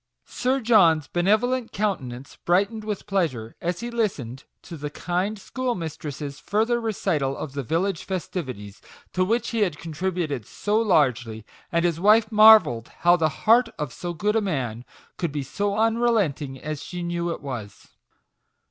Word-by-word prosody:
Sir 260 +2 -1
John's 170 - +4
benevolent 220 +7 +1
countenance 140 - -3
bright 190 +4 +3
ened 220 -1 -7
with 210 -2 -4
pleasure 155 - -1
as 175 +1 -2
he 240 0 -4
listened 140 - -2 0.2
to 170 - -9
the 150 -1 -5
kind 180 +7 -2
schoolmistress's 160 - -4
further 225 +7 0
recital 150 -11 -1
of 140 - -6
the 140 - -3
village 165 - -1
festivities, 130 - -5 0.3
to 185 - +2
which 230 +6 0
he 230 - -2
had 180 -8 +1
contributed 165 - -3
so 210 +1 0
largely 125 - +1
j - - -24 0.3
and 170 0 +1
his 170 -2 0
wife 215 +3 +4
marvelled 210 - +7
how 175 0 +6
the 160 -3 +2 0.2
heart 230 +2 +5
of 150 -5 -4
so 175 - -5
good 205 +6 -1
a 225 - +3
man 130 - -3 0.3
could 170 -4 -2
be 145 -1 -3
so 200 +8 -2
unrelenting 220 - +1
as 155 0 -5
she 180 -1 -6
knew 170 0 -2
it 170 - -3
was. 120 -7 -7
175 Hz, 160 wpm, -24 LUFS, 145-215 Hz, 0.3 s, marvelled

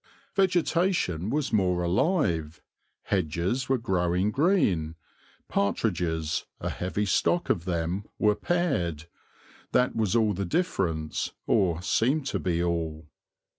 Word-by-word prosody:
Vegetation 175 - +1
was 145 -1 -1
more 90 -4 +2
alive, 85 - +1 0.4
hedges 95 - -1
were 135 - +3
growing 90 -2 0
green, 105 - +2 0.5
partridges, 85 -6 -1
a - - -3
heavy 95 +3 -2
stock 175 - +2
of 85 -5 -1
them, 90 +2 -2
were 105 -1 +3
paired; 105 - -1 0.7
that 125 - +2
was 110 -1 +1
all 110 -3 +3
the 100 +1 -2
difference, 85 - -1
or 90 -5 +2
seemed 135 +9 +1
to - - -1
be 85 -3 0
all. 80 -3 -3
95 Hz, 115 wpm, -27 LUFS, 85-125 Hz, 0.7 s, were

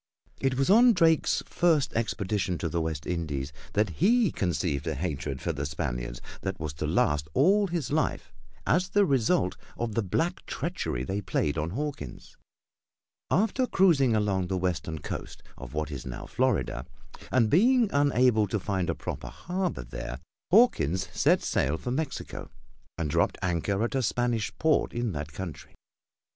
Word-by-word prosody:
It 135 -1 0
was 135 +6 +2
on 240 +3 +7
Drake's 165 -4 +3
first 165 -5 +2
expedition 100 -5 -1
to 85 +1 -2
the 85 +1 -1
West 80 -3 -3
Indies 75 -5 -3 0.2
that 105 -2 +2
he 225 -3 +4
conceived 85 -5 -1
a 80 - -1
hatred 70 -3 -3
for 85 - -1
the 70 -1 -4
Spaniards - - -3 0.2
that 95 0 -3
was 75 -3 -4
to - - 0
last 75 0 +1
all 200 +8 +4
his 170 -7 -3
life 155 +1 -1 0.3
as 180 +3 +2
the 205 +1 +4
result 140 +3 +2 0.2
of 115 -2 -2
the 115 - +1
black 165 - -1
treachery - - -3
they 95 +9 -2
played 75 -6 0
on 75 +1 -1
Hawkins. 120 - -5 0.9
After 225 +7 +2
cruising 145 - +4
along 100 -4 +1
the 95 +1 -1
western 85 -3 -2
coast - - -7
of 65 +1 -10
what 80 0 -2
is 70 -4 -5
now 65 -2 -6
Florida, 95 - 0 0.4
and 120 -4 +4
being 235 - +5
unable 125 -6 +3
to 105 +2 -1
find 95 -2 -1
a 85 - 0
proper - - -5
harbor 180 - -3
there, 60 +1 -6 0.3
Hawkins 155 - +4
set - - +3
sail 70 +4 +1
for 125 - -4
Mexico 145 +2 -4 0.5
and 80 - -1
dropped 70 - +1
anchor 95 +4 0
at 120 - -1
a 135 - +1
Spanish 120 -2 0
port 160 -1 +2
in 120 -2 -1
that 75 -2 -5
country. 85 -2 -8
100 Hz, 160 wpm, -28 LUFS, -, 0.9 s, on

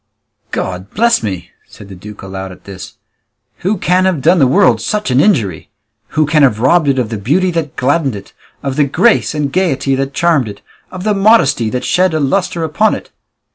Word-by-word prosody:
"God 95 +1 -4
bless 235 +1 +3
me!" 95 -5 -5 0.2
said 100 - -14
the 100 - -11
duke 105 +3 -11
aloud 95 0 -7
at 90 - -14
this, 95 -2 -10 0.6
"who 200 +4 -1
can 180 +1 +1
have 185 -5 +1
done 175 +4 +4
the 135 - +4
world 125 -3 +3
such 210 -9 -2
an 125 - +3
injury? 120 - +1 0.5
Who 155 - +4
can 150 +1 +2
have 120 -7 +3
robbed 150 +6 +3
it 135 -1 +2
of 125 -4 -1
the 110 -3 -4
beauty 170 - +1
that 165 -4 -3
gladdened 140 -1 0
it, 100 - -11 0.3
of 135 -1 -3
the 145 - +3
grace 185 - +2
and 145 -2 -2
gaiety 145 -7 0
that 135 +1 -2
charmed 165 -8 +2
it, 100 - -11 0.3
of 185 0 -8
the 215 0 +1
modesty 195 - +3
that 125 +2 -3
shed 180 -2 +1
a - - +1
lustre 170 +4 -1
upon 160 +8 +1
it?" - - -10
140 Hz, 205 wpm, -14 LUFS, 115-180 Hz, 0.6 s, done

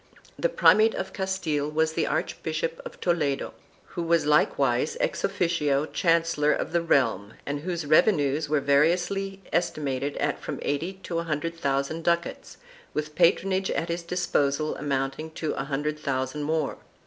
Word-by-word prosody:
The - - +2
primate 220 - +5
of 190 0 -4
Castile 175 -7 -1
was 160 +1 +1
the - - 0
Archbishop 485 0 -2
of - - -10
Toledo, 155 -6 0 0.4
who - - -4
was 170 -1 +2
likewise 140 -2 +2
ex - - -1
officio 165 -7 +1
chancellor 165 -3 +2
of - - -1
the 170 0 +2
realm 115 - +1
and 145 0 -2
whose 170 0 -3
revenues 150 -2 +3
were 150 -1 +2
variously 175 +7 +1
estimated 145 -5 -1
at 145 0 -1
from - - -5
eighty 160 +6 -1
to 170 -1 -2
a - - -2
hundred 165 +1 -2
thousand 140 +1 -1
ducats, 170 0 -1 0.4
with 150 0 -2
patronage 190 +3 +2
at 165 - -2
his 170 +1 -2
disposal 155 -4 0
amounting 135 +2 -2
to 155 - -2
a 135 - -3
hundred 150 +2 -2
thousand 130 0 -2
more. 155 -1 -1
155 Hz, 150 wpm, -26 LUFS, 145-170 Hz, 0.4 s, primate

